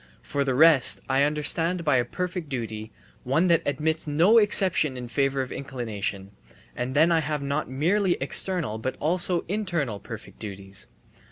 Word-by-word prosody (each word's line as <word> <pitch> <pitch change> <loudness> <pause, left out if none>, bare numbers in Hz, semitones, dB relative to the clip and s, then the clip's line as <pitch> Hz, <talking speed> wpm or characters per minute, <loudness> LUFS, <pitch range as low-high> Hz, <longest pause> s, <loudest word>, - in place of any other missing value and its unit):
For 140 - -2
the 135 -2 -1
rest, 150 -2 +5
I 135 +1 +1
understand 165 +4 0
by 145 -4 +3
a 120 - +1
perfect 180 +2 -5
duty 110 -4 -5 0.3
one 155 +8 +1
that 170 - +4
admits 155 +3 -1
no 170 +10 +5
exception 185 - +3
in 125 -1 -6
favour 135 +2 0
of 130 - -9
inclination 105 -7 -5 0.4
and 125 +2 -4
then 160 +4 +4
I 165 - +3
have 150 -2 -3
not 140 +1 -2
merely 175 +8 +1
external 145 - 0
but 130 +4 -4
also 175 +2 +2
internal 170 - -2
perfect - - -10
duties. 100 -2 -6
145 Hz, 160 wpm, -25 LUFS, 125-170 Hz, 0.4 s, rest